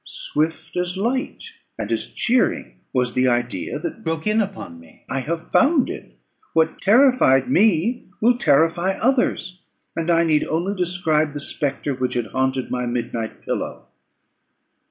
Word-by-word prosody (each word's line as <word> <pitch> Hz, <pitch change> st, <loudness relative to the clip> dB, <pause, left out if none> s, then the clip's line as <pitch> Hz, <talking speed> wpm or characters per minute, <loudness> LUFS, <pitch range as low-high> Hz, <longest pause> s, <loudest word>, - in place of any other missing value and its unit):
Swift 160 Hz, +1 st, -3 dB
as 180 Hz, +1 st, -1 dB
light 250 Hz, +7 st, -2 dB, 0.3 s
and -, -, -4 dB
as -, -, -1 dB
cheering 240 Hz, +1 st, 0 dB
was 125 Hz, -2 st, 0 dB
the 130 Hz, 0 st, +2 dB
idea 120 Hz, -7 st, -1 dB
that -, -, -6 dB
broke 160 Hz, -1 st, -3 dB
in 215 Hz, +1 st, +3 dB
upon 190 Hz, -, -6 dB
me. 85 Hz, -1 st, -19 dB
"I 135 Hz, -, -2 dB
have 160 Hz, +5 st, -4 dB
found 275 Hz, -1 st, +3 dB
it! -, -, -10 dB, 0.4 s
What 160 Hz, 0 st, +1 dB
terrified 205 Hz, -, +4 dB
me 210 Hz, -, +2 dB
will 240 Hz, +2 st, +3 dB
terrify 165 Hz, -, +3 dB
others; 220 Hz, -7 st, 0 dB, 0.3 s
and 165 Hz, +1 st, -2 dB
I 170 Hz, 0 st, +4 dB
need 155 Hz, -2 st, +2 dB
only 175 Hz, +5 st, -1 dB
describe 165 Hz, -5 st, 0 dB
the 145 Hz, -, -4 dB
spectre 145 Hz, 0 st, -3 dB
which 125 Hz, -1 st, -2 dB
had 120 Hz, -2 st, 0 dB
haunted 130 Hz, 0 st, -1 dB
my 125 Hz, -1 st, -1 dB
midnight 120 Hz, -2 st, -4 dB
pillow." -, -, -4 dB
160 Hz, 150 wpm, -22 LUFS, 130-195 Hz, 0.4 s, terrified